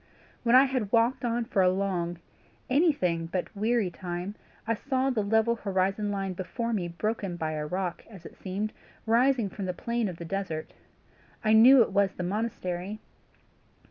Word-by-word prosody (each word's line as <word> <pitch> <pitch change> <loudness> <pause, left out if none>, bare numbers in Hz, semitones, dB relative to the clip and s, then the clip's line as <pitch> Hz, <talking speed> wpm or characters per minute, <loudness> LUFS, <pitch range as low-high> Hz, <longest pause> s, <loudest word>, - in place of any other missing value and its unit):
"After 235 +1 +6
I 265 - +8
had 255 -7 -1
walked 240 +3 +2
on 240 0 0
for 195 - +1
a 180 - +5
long, 180 -2 -1 0.5
anything 220 - +2
but 180 +4 -4
weary 215 -2 +1
time, 175 +2 -5 0.3
I 230 - +1
saw 265 +3 0
the 230 -4 0
level 220 +3 +2
horizon 195 0 0
line 195 -2 -2
before 230 +6 -3
me 185 -5 -1
broken 195 +1 -3
by 160 -2 -2
a 150 -1 -3
rock, 180 +1 -3
as 190 -6 -13
it - - -10
seemed, 200 +3 -4 0.3
rising 240 0 +3
from 195 +1 -6
the 180 - -2
plain 235 +1 -1
of 175 - -7
the 170 - -7
desert. 165 -3 -4 0.7
I 215 - +4
knew 245 +3 +8
it - - -5
was 200 -1 +2
the 180 - -5
monastery. 195 -1 -3
200 Hz, 175 wpm, -28 LUFS, 180-230 Hz, 0.7 s, I